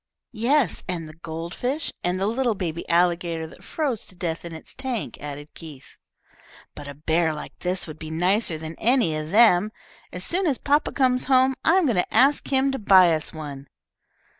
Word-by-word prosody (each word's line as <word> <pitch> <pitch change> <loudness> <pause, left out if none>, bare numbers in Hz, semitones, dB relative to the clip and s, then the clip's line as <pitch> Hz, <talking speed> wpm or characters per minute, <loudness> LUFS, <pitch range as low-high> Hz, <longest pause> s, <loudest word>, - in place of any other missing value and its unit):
"Yes, 240 - +1
and 170 -3 -4
the 155 - -11
gold 165 +1 -7
fish, 280 +5 -2
and 180 +1 0
the 195 - 0
little 235 +1 0
baby 170 -3 -4
alligator 170 -1 +1
that 160 - -14
froze 275 -9 -2
to 185 - -10
death 170 -2 -3
in 170 - -7
its 160 - -10
tank," 260 -4 -4
added 145 0 -8
Keith. 150 -5 -12 0.8
"But 145 - -9
a 145 - -8
bear 160 +2 0
like 150 - -9
this 180 +1 -1
would 155 -1 -10
be 155 - -7
nicer 180 +2 +1
than 160 +1 -7
any 235 -10 +2
of 155 0 -4
them. 210 -1 +5 0.4
As 180 - -6
soon 365 - 0
as 275 -5 +1
papa 290 +1 +1
comes 255 -2 +1
home 260 0 +4
I 325 - +4
am 375 -3 +3
going 235 -9 +1
to 180 - 0
ask 280 +3 +3
him 270 0 +2
to 270 - -3
buy 185 -5 +6
us 155 -1 -2
one." 145 -3 -8
180 Hz, 195 wpm, -24 LUFS, 160-255 Hz, 0.8 s, buy